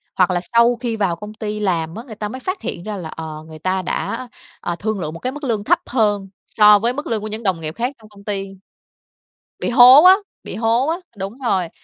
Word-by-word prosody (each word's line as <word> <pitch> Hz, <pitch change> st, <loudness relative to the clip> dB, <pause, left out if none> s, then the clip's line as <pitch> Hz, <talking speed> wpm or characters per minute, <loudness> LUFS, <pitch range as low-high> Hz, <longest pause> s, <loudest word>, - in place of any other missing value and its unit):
Hoặc 185 Hz, -1 st, +3 dB
là 175 Hz, -1 st, 0 dB
sau 235 Hz, +1 st, +5 dB
khi 235 Hz, -2 st, -3 dB
vào 190 Hz, -5 st, 0 dB
công 210 Hz, +5 st, -9 dB
ty 215 Hz, -1 st, -4 dB
làm 170 Hz, -5 st, -1 dB
á, 225 Hz, -, -7 dB
người 235 Hz, -4 st, -10 dB
ta 210 Hz, 0 st, -4 dB
mới 255 Hz, -, -7 dB
phát 370 Hz, +7 st, -4 dB
hiện 170 Hz, -, -5 dB
ra 210 Hz, 0 st, -5 dB
là, 170 Hz, -4 st, -6 dB
ờ, 155 Hz, -1 st, -7 dB
người 155 Hz, -1 st, -11 dB
ta 185 Hz, +3 st, -1 dB
đã, 235 Hz, +7 st, -3 dB, 0.3 s
ờ, 175 Hz, -, -3 dB
thương 215 Hz, -1 st, -2 dB
lượng 155 Hz, -3 st, -4 dB
một 165 Hz, -, -8 dB
cái 255 Hz, -, -2 dB
mức 295 Hz, +1 st, -9 dB
lương 225 Hz, -6 st, -1 dB
thấp -, -, +3 dB
hơn 205 Hz, -5 st, 0 dB, 0.2 s
so 210 Hz, -1 st, +6 dB
với 235 Hz, +4 st, 0 dB
mức 290 Hz, +3 st, -5 dB
lương 220 Hz, -2 st, -1 dB
của 215 Hz, -, -5 dB
những 215 Hz, +2 st, -6 dB
đồng 190 Hz, -5 st, 0 dB
nghiệp 155 Hz, +1 st, -5 dB
khác 245 Hz, +4 st, -2 dB
trong 215 Hz, -1 st, -17 dB
công 200 Hz, -1 st, -17 dB
ty 195 Hz, -1 st, -3 dB, 1.1 s
bị -, -, -1 dB
hố 250 Hz, +3 st, +9 dB
á, 370 Hz, +1 st, +10 dB, 0.3 s
bị -, -, -7 dB
hố 230 Hz, +5 st, +1 dB
á, 325 Hz, -, +1 dB, 0.2 s
đúng 195 Hz, +2 st, -5 dB
rồi. 185 Hz, -7 st, +1 dB
210 Hz, 250 wpm, -20 LUFS, 185-235 Hz, 1.1 s, á